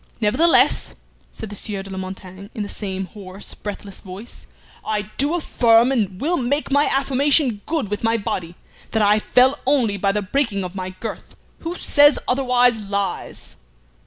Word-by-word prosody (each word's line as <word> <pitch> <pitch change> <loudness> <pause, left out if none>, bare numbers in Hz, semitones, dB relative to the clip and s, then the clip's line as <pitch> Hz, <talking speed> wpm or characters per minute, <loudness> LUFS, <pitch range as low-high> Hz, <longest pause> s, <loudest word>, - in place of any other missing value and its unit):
"Nevertheless," 255 +11 +3 0.4
said 220 -2 -8
the - - -6
Sieur 200 -1 -4
de 195 - -10
la 190 - -6
Montaigne, 190 +1 -8
in 215 - -2
the - - -5
same 190 -2 -4
hoarse, 195 0 -8
breathless 205 -1 -8
voice, 195 +5 -10 0.4
"I 210 -1 -2
do 290 +5 +2
affirm, 235 -6 +4
and 200 -8 -1
will 340 +5 0
make 275 +4 -1
my 285 +2 +4
affirmation 270 -3 +2
good 310 -10 -1
with 210 - -3
my 225 0 +2
body, 175 -5 -4 0.4
that 220 -1 +2
I 210 +1 +4
fell 260 +6 +3
only 245 -8 +2
by 195 0 +1
the 210 +1 -1
breaking 205 -2 0
of 180 0 -6
my 185 -1 -5
girth. 225 - -7 0.2
Who 335 +2 -5
says 290 -3 +5
otherwise 250 -2 +3
lies!" 200 -1 -4
215 Hz, 165 wpm, -21 LUFS, 195-270 Hz, 0.4 s, says